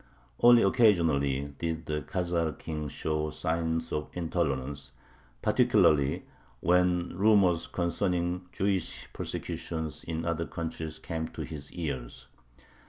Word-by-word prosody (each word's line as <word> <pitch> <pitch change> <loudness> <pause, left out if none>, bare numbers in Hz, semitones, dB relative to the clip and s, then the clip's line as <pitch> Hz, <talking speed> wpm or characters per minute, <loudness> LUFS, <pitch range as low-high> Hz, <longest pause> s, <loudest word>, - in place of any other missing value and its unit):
Only 120 -1 +7
occasionally 80 - +3
did 80 -1 -2
the 75 0 -2
Khazar 85 0 -1
king 75 -1 -4
show 75 +2 -2
signs 80 +1 -1
of 75 0 -2
intolerance, 70 -6 -2 0.5
particularly 70 -2 +3 0.3
when 90 0 +2
rumors 95 -4 +4
concerning 90 0 -1
Jewish 95 -2 -1
persecutions 80 -2 -4
in 80 0 -3
other 85 -1 -1
countries 80 -1 -5
came 80 0 -4
to - - -6
his 75 -3 -7
ears. 70 -8 -5
80 Hz, 105 wpm, -29 LUFS, 75-90 Hz, 0.5 s, Only